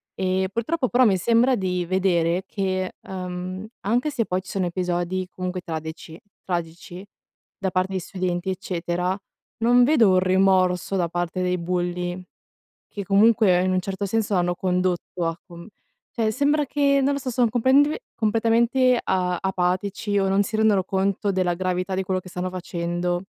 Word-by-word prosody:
Eh, 190 0 0
purtroppo 255 +5 -1
però 245 +2 +3
mi 200 -6 +4
sembra 235 +6 +3
di 180 -2 -1
vedere 180 -1 +1
che, 185 -2 -2
ehm, 185 +1 -6
anche 245 +8 0
se 245 -5 0
poi, 185 -1 -1
ci 190 - -14
sono 190 -2 -1
episodi 180 +1 -2
comunque 185 0 -4
tradeci 160 -1 -7 0.3
tragici 175 +1 -5 0.5
da 195 - -1
parte 185 +2 0
di 190 - 0
studenti 180 0 -3
eccetera, 180 0 -2 0.4
non 245 +2 +5
vedo 245 -6 +5
un 185 - +4
rimorso 185 0 +2
da 175 -3 0
parte 175 +1 -2
dei 180 0 0
bulli, 175 +1 -2 0.7
che 205 - -6
comunque 200 -2 +4
in 185 0 +1
un 185 - +2
certo 195 +2 -4
senso, 215 0 0
hanno 175 -1 +1
condotto 180 -1 -1
a 165 - -1
com 170 -2 -11 0.4
cioè, 225 -2 0
sembra 290 +4 +1
che, 280 0 +2
non 280 +1 +2
lo - - -2
so, 260 -2 -4
sono 240 0 +2
complentve, 265 - +3
completamente 235 +3 +2
a 180 -2 0
apatici 190 +2 -1
o 195 -1 +1
non 195 +1 +3
si 215 +2 -3
rendono 215 -3 +3
conto 195 +1 0
della 185 -2 +1
gravità 185 +1 -2
di 190 - 0
quello 185 0 -1
che 185 - -13
stanno 180 +1 -4
facendo. 175 0 -3
185 Hz, 165 wpm, -23 LUFS, 180-215 Hz, 0.7 s, non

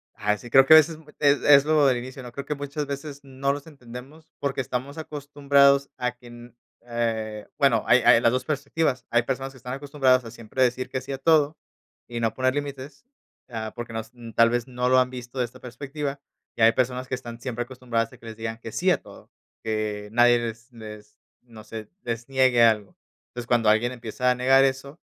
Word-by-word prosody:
Ah 105 0 0
sí, 120 - -12
creo 135 +2 +7
que 155 - +7
a - - +12
veces 155 +1 +3 0.2
es 145 -1 +3
es 140 -1 +7
lo 155 -1 +3
del 130 -2 +3
inicio, 130 +2 -8
¿no? 125 - -9
Creo 140 +3 -7
que 150 - -3
muchas 145 +1 -4
veces 140 0 -6
no 135 0 -2
nos 145 0 -7
entendemos, 140 +3 -12
porque 140 -1 -1
estamos 130 +3 -5
acostumbrados 140 -2 +2
a 125 -1 -1
que 125 - -16
en 120 0 -13 0.3
eh, 110 -3 -3
bueno, 135 -6 +3
hay 125 - +6
hay 115 - +6
las 115 - +4
dos 130 +1 -1
perspectivas. 145 -2 -1
Hay 120 0 +2
personas 135 +2 -4
que - - -15
están 125 0 -7
acostumbradas 135 -2 +2
a 115 - -8
siempre 115 +4 -2
decir 125 +1 0
que 130 - -3
sí 135 +2 -8
a 135 - -3
todo, 155 +1 +3 0.5
y 120 -1 -5
no 115 -2 0
poner 130 0 +1
límites, 140 - -6 0.4
ah, 110 -2 -5
porque 120 -1 -7
nos, 110 0 -5 0.2
tal 115 0 +6
vez 120 0 -1
no 125 0 -1
lo 130 0 +5
han 125 - +2
visto 125 0 -8
de 125 - +2
esta 120 +2 -13
perspectiva, 140 +3 -6 0.4
y - - -5
hay 115 0 +7
personas 125 +1 -1
que - - -2
están 120 -2 -9
siempre 120 -1 -4
acostumbradas 120 -2 -3
a - - -14
que - - -17
les 115 -1 -8
digan 115 0 -5
que 115 - -8
sí 185 +8 +1
a - - +1
todo, - - -15 0.3
que 105 -2 -3
nadie 120 +1 +5
les 115 +1 -6
les, 105 -2 -12 0.2
no 115 -3 -14
sé, 110 0 -8 0.2
les 115 -1 -4
niegue 130 -3 +4
algo. 110 -3 +2 0.3
Entonces, 120 -1 -8
cuando 120 -3 +3
alguien 110 +3 +3
empieza 120 +1 -2
a 125 - +3
negar 135 +2 +5
eso, 135 +3 -3
125 Hz, 215 wpm, -25 LUFS, 115-140 Hz, 0.5 s, a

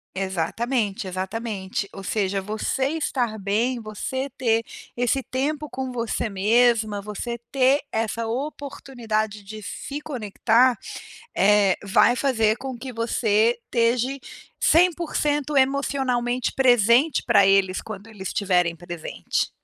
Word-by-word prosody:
Exatamente, 195 +4 -1
exatamente. 190 +1 -4
Ou 195 - -9
seja, 195 -1 -1
você 215 +6 -1
estar 240 -7 -1
bem, 225 +6 0
você 260 +6 -4
ter 230 -3 +2 0.3
esse 245 +2 0
tempo 295 +3 -2
com 260 -2 -5
você 235 -2 -2
mesma, 215 +1 +2
você 215 +4 -5
ter 270 +1 +3
essa 225 +1 -2
oportunidade 230 -5 -3
de 215 +1 -9
se 280 +7 -6
conectar, 240 -2 +2 0.6
eh, 205 -1 +4
vai 200 +5 +4
fazer 225 -5 +2
com 260 -1 -6
que 255 +1 -7
você 230 0 +2
esteja 245 +3 +1 0.4
100% 305 -4 +2
emocionalmente 265 -3 +1
presente 245 +3 +4
para 200 - +5
eles, 195 -1 +3
quando 210 -1 -8
eles 205 -4 -8
estiverem 180 -4 +1
presente. 175 -1 -3
230 Hz, 115 wpm, -24 LUFS, 205-260 Hz, 0.6 s, para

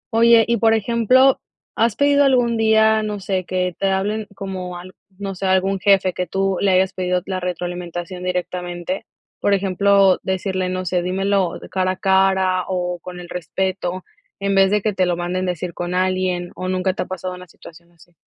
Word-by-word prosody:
Oye, 230 0 +6
y 235 0 +2
por 225 +1 +4
ejemplo, 235 +4 +3 0.3
¿has 225 -1 +2
pedido 285 0 +4
algún 245 -3 +3
día, 220 0 +4
no 210 -1 -3
sé, 185 -1 -2
que 180 -1 -2
te 195 - +1
hablen 205 +3 -1
como 185 -2 -6
al 185 +1 -11 0.2
no 195 -1 -4
sé, 190 +1 -3
algún 190 +1 +1
jefe 195 -2 +3
que 180 0 -3
tú 195 -1 0
le 200 - +3
hayas 185 0 +3
pedido 180 -1 -1
la 190 -1 -3
retroalimentación 180 0 -5
directamente?, 180 0 -4 0.3
por 200 - +2
ejemplo, 195 0 +3
decirle, 190 -1 -2
no 185 0 -3
sé: 180 +1 0
"Dímelo 190 0 0
cara 185 -1 0
a - - -9
cara, 190 -1 +2
o 180 -1 -2
con 180 +1 -9
el 175 - -9
respeto", 185 +1 -3 0.4
en 200 0 -1
vez 195 0 +5
de 210 0 +1
que 215 - 0
te 185 -1 +1
lo 175 - 0
manden 180 +1 -2
decir 175 -1 -3
con 175 +1 -4
alguien, 185 -1 0
o 185 - -5
nunca 185 0 0
te - - -4
ha - - -2
pasado 185 0 -5
una 180 0 -11
situación 170 +1 -16
así. 170 +1 -23
185 Hz, 190 wpm, -20 LUFS, 180-200 Hz, 0.4 s, Oye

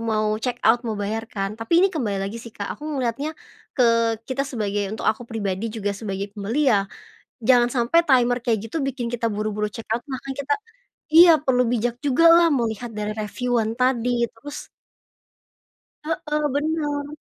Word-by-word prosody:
mau 215 -1 0
check 245 0 -2
out, 230 +2 +5
mau 220 - -2
bayar 220 +2 -3
kan. 195 -1 -3
Tapi 230 - +2
ini - - +5
kembali 230 -11 -1
lagi 195 +4 -4
sih 235 - -9
Kak, 200 -2 -5
aku 305 - -5
melihatnya, 280 +2 -2 0.4
ke 230 -2 +3
kita 260 +2 -3
sebagai 205 -4 -2
untuk 215 +2 -6
aku 225 +2 0
pribadi 205 -1 -2
juga 210 -2 -3
sebagai 200 -1 -5
pembeli 230 +7 +1
ya. 200 -2 +1 0.6
Jangan 245 0 +5
sampai 240 +7 +3
timer 245 -2 +4
kayak 225 -2 -2
gitu, 325 - -2
bikin 245 -3 -3
kita 235 -1 -1
buru-buru 210 0 -2
check 225 +2 -8
out. 225 - +1
Makanya 270 0 -5
kita 290 - +3 0.6
iya. 340 0 +10
Perlu 260 -3 +2
bijak 240 0 0
jugalah 330 +4 +5
melihat 235 -2 -1
dari 210 0 -4
reviewan 230 +1 -2
tadi. 245 -1 +1
Terus 250 +6 -10 1.4
Heeh. 300 -1 -2
Benar. 290 -1 -1
235 Hz, 165 wpm, -23 LUFS, 215-265 Hz, 1.4 s, iya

